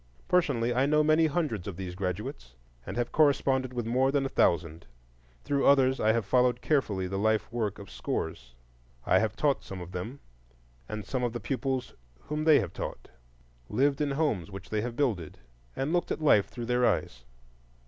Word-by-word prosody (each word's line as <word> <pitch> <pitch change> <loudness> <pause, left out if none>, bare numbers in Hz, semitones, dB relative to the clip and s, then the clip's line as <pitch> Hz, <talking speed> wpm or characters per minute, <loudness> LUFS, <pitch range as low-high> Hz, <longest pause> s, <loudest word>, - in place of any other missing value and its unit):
Personally 130 -10 +2
I 130 +3 +2
know 150 +1 +4
many 155 +1 +4
hundreds 145 - -2
of 95 -4 -6
these 90 -2 -5
graduates, 90 -10 -5 0.3
and - - -5
have 120 -1 -1
corresponded 135 -4 +2
with 120 -2 -3
more 130 +3 +2
than 140 -1 +1
a - - -2
thousand; 85 - +1 0.6
through 140 -1 +1
others 135 -1 +4
I 110 - +3
have 115 -2 0
followed 125 +1 +3
carefully 110 -11 0
the 95 +1 -3
life 110 +2 +1
work 110 -4 -1
of 100 -5 -11
scores; - - -4 0.5
I - - +4
have 110 -1 -1
taught 145 -2 +1
some 95 - -7
of 90 0 -8
them 110 +10 -6 0.7
and 110 -1 -5
some 125 +5 -2
of 120 -2 -1
the 120 - -3
pupils 130 +3 -2 0.3
whom 150 +1 -3
they 155 -3 +7
have - - -5
taught, - - -6 0.6
lived 140 +2 +1
in 145 - +1
homes 135 - 0
which 95 -1 -10
they 105 -1 0
have 120 +1 -4
builded, 110 - -1 0.4
and 140 +5 -1
looked 175 - 0
at - - -1
life 140 -10 +4
through 120 -2 -7
their 125 +1 +1
eyes. 65 - 0
120 Hz, 190 wpm, -29 LUFS, 95-140 Hz, 0.7 s, they